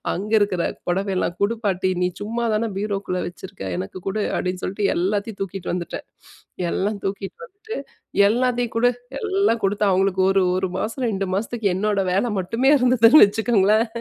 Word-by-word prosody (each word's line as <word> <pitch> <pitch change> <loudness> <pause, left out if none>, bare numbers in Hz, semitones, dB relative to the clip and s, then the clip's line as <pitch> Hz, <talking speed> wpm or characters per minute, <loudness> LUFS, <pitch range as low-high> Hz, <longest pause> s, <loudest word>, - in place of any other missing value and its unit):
அங்க 205 +4 -4
இருக்கிற 200 -4 +1 0.2
"பொடவையெல்லாம் 185 -1 -1
குடு 205 +3 +2
பாட்டி. 190 -2 +1
நீ 180 - +2
சும்மா 230 +3 -2
தானே 220 +1 0
பீரோக்குள்ளே 195 -3 -2
வச்சுருக்க? 175 - -9
எனக்கு 95 - -5
குடு" 205 +2 -1
அப்படின்னு 180 0 -2
சொல்ட்டு 195 +2 -1
எல்லாத்தையும் 200 +4 -1
தூக்கிட்டு 195 -1 -4
வந்துட்டேன். 175 -1 -4 0.7
எல்லாம் 205 +2 -1
தூக்கிட்டு 195 0 -4
வந்துட்டு, 435 +2 -9 0.5
எல்லாத்தையும் 245 0 0
குடு. 245 +2 +4 0.3
எல்லாம் 390 - +1
கொடுத்தா, 205 +1 +1
அவங்களுக்கு 190 0 +2
ஒரு, 195 -1 +3
1 185 -1 -1
மாசம், 240 +4 -3
2 195 -2 -2
மாசத்துக்கு 220 +1 -1
என்னோட 205 +1 +1
வேல 195 +6 +2
மட்டுமே 230 +9 +1
இருந்ததுன்னு 250 +2 +6
வச்சுக்கோங்களேன். 215 +1 +2
205 Hz, 150 wpm, -22 LUFS, 190-230 Hz, 0.7 s, இருந்ததுன்னு